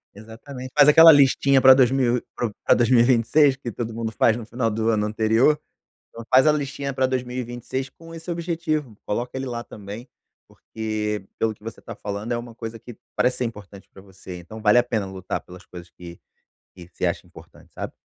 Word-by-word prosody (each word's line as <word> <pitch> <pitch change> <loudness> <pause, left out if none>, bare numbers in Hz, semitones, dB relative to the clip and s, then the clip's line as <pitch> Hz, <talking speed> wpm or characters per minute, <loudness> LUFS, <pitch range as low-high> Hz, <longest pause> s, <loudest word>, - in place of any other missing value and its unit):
Exatamente. 125 +5 -10
Faz 145 -1 +7
aquela 160 +2 +9
listinha 140 -1 +4
pra 130 0 +9
2000 130 -1 +3
e - - -6
pra 120 - -2
pra - - +4
2026, 125 +3 +3
que 130 -2 -6
todo 115 +1 -5
mundo 115 0 -4
faz 110 +2 +2
no 115 - -8
final 115 0 -2
do 110 +1 -1
ano 105 -2 +1
anterior. 110 +7 +2 0.5
Então 115 - -11
faz 130 +3 +6
a 155 - +6
listinha 140 -1 -3
pra 130 0 0
2026 125 0 -4
com 165 0 -14
esse 165 +2 -8
objetivo, 165 - -3
coloca 120 +5 -4
ele 130 - -3
lá 120 -2 -4
também, 105 +2 -10 0.4
porque 105 -2 -5
pelo 110 -1 0
que 105 - -30
você 115 +1 -9
tá 115 - -8
falando 105 +3 -5
é 120 - -1
uma 120 -1 -9
coisa 115 0 -7
que 120 +1 -12 0.2
parece 125 - +1
ser 125 - -1
importante 105 -4 -9
pra - - -14
você. 95 -2 -11
Então 100 +6 -11
vale 105 +2 +5
a - - +5
pena 115 -4 -2
lutar 95 -1 -5
pelas 90 +1 -14
coisas 90 -1 -12
que 85 -1 -12 0.6
que 90 -2 -12
você - - -2
acha - - -3
importante, - - -17
sabe. - - -6
120 Hz, 200 wpm, -23 LUFS, 110-130 Hz, 0.6 s, aquela